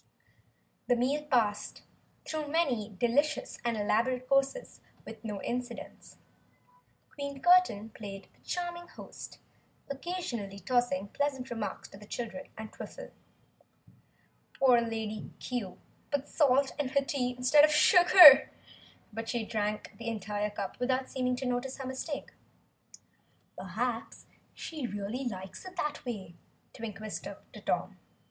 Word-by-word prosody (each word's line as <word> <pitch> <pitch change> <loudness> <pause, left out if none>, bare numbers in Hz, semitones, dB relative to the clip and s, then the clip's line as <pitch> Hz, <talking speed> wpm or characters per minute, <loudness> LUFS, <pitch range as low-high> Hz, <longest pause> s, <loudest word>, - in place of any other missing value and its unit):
The 245 - +4
meal 265 +5 +1
passed, 220 -6 0 0.4
through 310 -1 -3
many 255 - 0
delicious 280 +6 +1
and 235 -2 0
elaborate 245 +5 +1
courses, 275 - 0 0.2
with - - -10
no 210 -3 -5
incidents. 245 0 -5 1.0
Queen 280 -1 -5
Curtain 350 - +4
played 200 -2 -8
the - - -30
charming 345 -1 -4
host, - - -10 0.5
occasionally 270 - -4
tossing 205 -2 0
pleasant 270 -1 -2
remarks 225 -3 -4
to 195 - -13
the 210 - -13
children 245 +5 -5
and 220 0 -8
Twiffle. - - -9 1.5
Poor 250 -3 +6
Lady 220 -2 -4
Cue 230 -8 -4 0.3
put 285 0 -1
salt 275 -2 +3
in 280 -3 0
her 275 +1 +1
tea 250 -3 -1
instead 255 +4 +6
of 305 - +7
sugar, 350 -2 +9 0.6
but 225 +1 -5
she 235 -3 -1
drank 210 -1 -2
the 230 - -6
entire 210 -1 -2
cup 200 -2 -5
without 260 +1 0
seeming 250 -1 0
to 260 - -5
notice 250 +1 -2
her 270 - -6
mistake. 265 +3 -5 1.2
"Perhaps 225 +6 -3 0.3
she 305 -6 -5
really 205 +5 -4
likes 190 -4 -6
it 370 -1 -10
that 300 -3 -2
way," 195 -8 -5 0.4
Twink 220 -3 -6
whispered 215 -1 -6 0.2
to - - -10
Tom. - - -2
245 Hz, 130 wpm, -31 LUFS, 215-280 Hz, 1.5 s, sugar